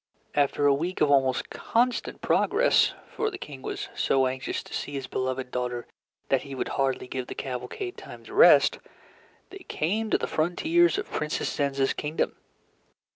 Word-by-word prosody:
After 145 0 +2
a 140 - +6
week 170 +6 -2
of 145 - +3
almost 135 -2 +2
constant 245 +1 0
progress 470 +4 +3 0.2
(for 445 -1 -1
the 380 - -7
King 140 - -9
was - - -4
so 135 -1 +2
anxious 130 0 -3
to - - -12
see 145 - -4
his 135 -2 -3
beloved 130 0 -3
daughter 125 -1 -3 0.4
that 135 - +3
he 140 -1 -8
would - - -3
hardly 135 -2 -1
give 130 -1 -4
the - - -6
cavalcade 130 - -5
time - - -11
to - - -12
rest), - - +6 0.7
they 390 - -9
came 215 - -2
to - - +3
the - - -2
frontiers 320 - +2
of 410 - -5
Princess 155 0 -2
Zenza's 140 -2 +1
kingdom. 150 +2 -2
145 Hz, 170 wpm, -27 LUFS, -, 0.7 s, a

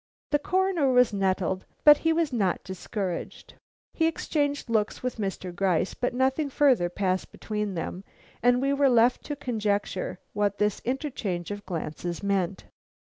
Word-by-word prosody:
The 295 - +3
Coroner 365 -4 +1
was 250 -3 +4
nettled, 190 -1 0 0.2
but 295 -1 +8
he 325 - +2
was 320 -4 +1
not 195 -7 0
discouraged. 190 0 -5 0.4
He 325 - +2
exchanged 290 -3 -1
looks 220 -1 0
with 250 -1 -2
Mr. 195 -3 -4
Gryce, 185 -1 +1
but 245 0 -2
nothing 265 +3 +1
further 260 - +3
passed 185 0 -1
between 210 -3 -3
them 175 +3 -4 0.4
and 245 +2 +3
we 275 +1 +2
were 280 -1 +4
left 240 0 +4
to 290 - -3
conjecture 210 -8 -2 0.2
what 205 -1 0
this 210 -1 +1
interchange 235 - -3
of 205 -1 -7
glances 170 0 -4
meant. 195 -1 0
215 Hz, 150 wpm, -27 LUFS, 190-275 Hz, 0.4 s, but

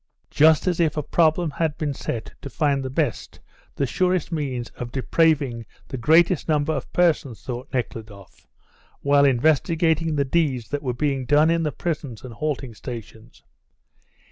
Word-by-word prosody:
"Just 155 +1 +5
as 180 -2 0
if 160 -2 +1
a 150 - -1
problem 165 +1 +2
had 155 +1 -2
been 150 -2 -2
set 115 -4 -5
to 140 - -7
find 140 -1 0
the 130 - -4
best, 135 -3 -2 0.4
the 140 - 0
surest 180 +6 0
means 130 -7 -3
of 120 -1 -7
depraving 135 -4 +1 0.2
the 130 - -4
greatest 160 +6 +3
number 155 0 +1
of 135 -4 -5
persons," 155 -9 +1
thought 125 +2 -6
Nekhludoff, 110 -6 -6 0.5
while 140 0 +4
investigating 160 +4 +2
the 140 -1 +1
deeds 135 -6 0
that 145 -1 -3
were 125 -4 -3
being 135 -1 -1
done 150 +3 +4
in 165 0 +1
the 155 -2 -1
prisons 145 -6 -4
and 125 -2 -8
halting 135 -2 -3
stations. 115 -1 -10
145 Hz, 160 wpm, -23 LUFS, 125-160 Hz, 0.5 s, Just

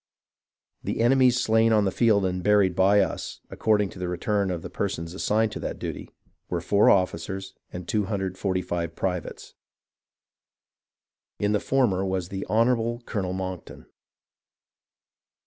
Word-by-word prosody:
The - - -3
enemy's 125 0 +4
slain 110 -1 +3
on 105 -2 +4
the 95 - +1
field 105 -4 +3
and 90 0 -1
buried 100 -2 +3
by 100 +2 +5
us 95 - -3
— - - -41
according 105 -2 +1
to 90 - -12
the 90 - -3
return 100 +3 -1
of 85 -3 -3
the - - -6
persons 85 +1 -3
assigned 110 +3 +1
to - - -6
that - - -4
duty - - -6 0.2
— - - -46
were 90 - -1
four 100 +4 +3
officers 95 +1 0 0.2
and 90 -1 -7
245 95 -4 -2
privates. 90 -3 -4 1.8
In 105 0 0
the 105 - +2
former 115 -9 +1
was 95 -2 -2
the 95 0 -5
Honourable 115 +1 +1
Colonel 95 -4 -3
Monckton. 95 -2 -6
95 Hz, 145 wpm, -25 LUFS, 90-110 Hz, 1.8 s, by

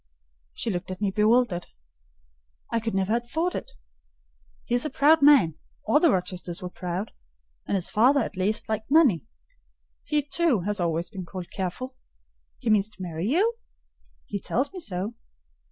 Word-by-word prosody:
She 230 - -2
looked 180 0 -4
at 185 - -5
me 205 -2 0
bewildered. 210 -3 +2 1.0
"I 230 - +1
could 225 -2 -3
never 195 +2 +1
have 240 0 -1
thought 335 +6 0
it. - - -5 1.0
He - - -3
is 245 - +3
a 305 - -2
proud 305 +3 +4
man: 235 - +6 0.3
all 225 +7 +4
the 335 - +5
Rochesters 180 -3 -1
were 180 -1 -6
proud: 180 +4 -4 0.6
and - - 0
his 185 -3 -1
father, 255 +6 +5
at - - -4
least, 200 +4 -1
liked 220 +1 -3
money. 275 - +4 0.8
He, 300 -1 0
too, 290 - +1
has 205 +2 -2
always 170 +1 -1
been 190 -4 -6
called 180 -2 -7
careful. 230 +8 -4 0.6
He 225 - -1
means 210 0 +3
to 200 - -15
marry 170 +1 -3
you?" 385 - +3 0.7
"He 200 - -4
tells 265 - -1
me 370 - -6
so." 205 - -3
215 Hz, 170 wpm, -26 LUFS, 185-260 Hz, 1.0 s, man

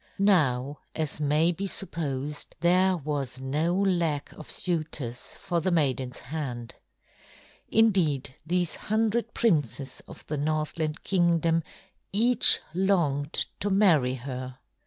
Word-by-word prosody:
Now, 145 -9 +2 0.2
as 155 -1 -2
may 155 +3 +3
be 195 +4 -4
supposed, 150 -7 -3
there 185 +2 +4
was 140 -4 -4
no 150 +6 0
lack 175 -7 0
of 155 - -12
suitors 155 -8 -3
for 170 -1 -2
the 185 - 0
maiden's 135 -7 0
hand. 125 -4 -5 1.0
Indeed 180 - +2
these 175 0 0
hundred 225 +2 -1
princes 145 - 0
of - - -12
the 150 - -3
Northland 155 +1 -2
Kingdom 170 -3 +2 0.5
each 235 +3 +5
longed 170 -6 +1
to 205 - -1
marry 165 -11 +4
her. 130 0 -6
155 Hz, 115 wpm, -27 LUFS, 140-185 Hz, 1.0 s, each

